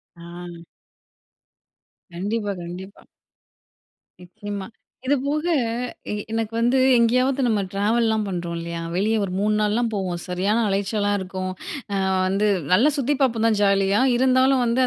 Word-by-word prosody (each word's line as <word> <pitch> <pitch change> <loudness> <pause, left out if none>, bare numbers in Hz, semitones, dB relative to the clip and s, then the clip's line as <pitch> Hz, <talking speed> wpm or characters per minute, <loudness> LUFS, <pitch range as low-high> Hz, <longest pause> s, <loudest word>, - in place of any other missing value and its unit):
ஆ. 170 0 -10 1.5
கண்டிப்பா, 205 +4 -2
கண்டிப்பா. 185 +3 -9 1.2
நிச்சயமா. 205 +1 -7 0.4
இதுபோக 285 +2 0 0.7
எ - - -1 0.2
எனக்கு 225 0 -2
வந்து 245 +3 +3 0.2
எங்கேயாவது 255 +4 +2
நம்ம 215 -3 +1
டிராவல்லாம் 220 +1 +1
பண்றோம் 175 -2 -4
இல்லயா! 170 0 -5
வெளிய 215 +4 +1
ஒரு 195 - -3
3 210 +1 +1
நாள்லாம் 225 +2 +1
போவோம். 185 -4 -2
சரியான 200 +6 +1
அலைச்சலா 205 +1 0
இருக்கும். 185 0 -4 0.4
ஆ 195 - 0 0.3
வந்து 200 +3 +1 0.3
நல்லா 240 +11 +5
சுத்தி 280 +2 +1
பார்ப்போம் 230 -4 +2
தான் 220 - +2
ஜாலியா. 195 +1 +3
இருந்தாலும் 260 +1 +3
வந்து 235 +2 +1
210 Hz, 120 wpm, -23 LUFS, 190-235 Hz, 1.5 s, நல்லா